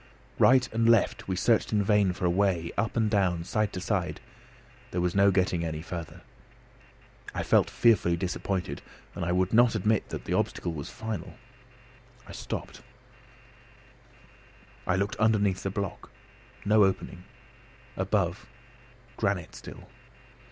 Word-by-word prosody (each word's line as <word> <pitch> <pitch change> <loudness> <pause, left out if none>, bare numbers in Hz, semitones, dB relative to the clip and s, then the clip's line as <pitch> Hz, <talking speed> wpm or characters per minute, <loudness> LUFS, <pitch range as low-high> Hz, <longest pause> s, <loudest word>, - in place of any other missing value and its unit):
Right 130 0 +5
and 115 +1 +2
left 115 -3 +2
we 95 - -1
searched 110 +4 +2
in 105 -2 +2
vain 100 -2 +3
for 90 - -4
a - - +3
way, 90 -3 +1
up 115 +1 -1
and 110 -2 +3
down, 95 -5 +1
side 110 +3 -1
to - - -4
side; 95 -1 -2 0.7
there 90 - -3
was 90 0 0
no 100 0 +5
getting 90 -3 +1
any 80 -1 -4
farther. 85 -2 -7 1.1
I - - -1
felt - - +3
fearfully 95 -7 +3
disappointed, 90 -3 -3 0.3
and - - -5
I 85 - -1
would 90 +2 +1
not 120 0 +5
admit 110 +1 +1
that - - -6
the - - -2
obstacle 85 - -1
was 70 -3 -6
final. 110 -1 -6 0.9
I - - -10
stopped, - - -6 2.1
I 95 - +2
looked 100 +2 -1
underneath 105 -4 +2
the 95 - -2
block: 100 -1 -5 0.6
no 105 0 +5
opening. 95 -1 -1 0.7
Above: 95 -1 -1 0.7
granite 100 -5 -1
still. - - -11
95 Hz, 140 wpm, -28 LUFS, 90-105 Hz, 2.1 s, Right